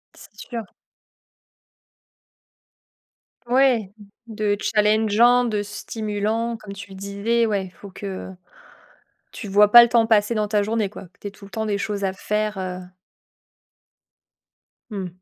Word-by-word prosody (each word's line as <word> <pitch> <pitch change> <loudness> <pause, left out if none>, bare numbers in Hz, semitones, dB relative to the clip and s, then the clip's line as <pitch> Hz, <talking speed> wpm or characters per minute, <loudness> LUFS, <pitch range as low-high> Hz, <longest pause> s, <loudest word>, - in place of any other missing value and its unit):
C'est 205 - -14
sûr. 235 -2 -4 2.8
Ouais, 245 -5 +3 0.4
de 215 -2 -1
challengeant, 220 +3 +3
de 210 -3 -1
stimulant, 215 +2 -3
comme 210 -2 -10
tu 200 0 -10
le - - -10
disais. 200 +4 0
Ouais, 195 -4 -2
faut 200 - -11
que 190 0 -7 1.0
tu 215 - -8
vois 205 +1 +4
pas 240 - +11
le 235 - +1
temps 230 -1 +4
passer 220 0 +2
dans 210 -1 0
ta 210 0 +1
journée, 215 -1 -1
quoi, 210 - -10
que 180 +4 -33
tu - - -7
aies - - -6
tout 200 0 -15
le 200 - -15
temps 220 +1 -3
des 205 -2 -1
choses 205 -1 -3
à 190 -1 0
faire, 210 +1 -2
heu 185 -1 -4 2.1
mmh 195 -3 -4
210 Hz, 140 wpm, -22 LUFS, 200-225 Hz, 2.8 s, pas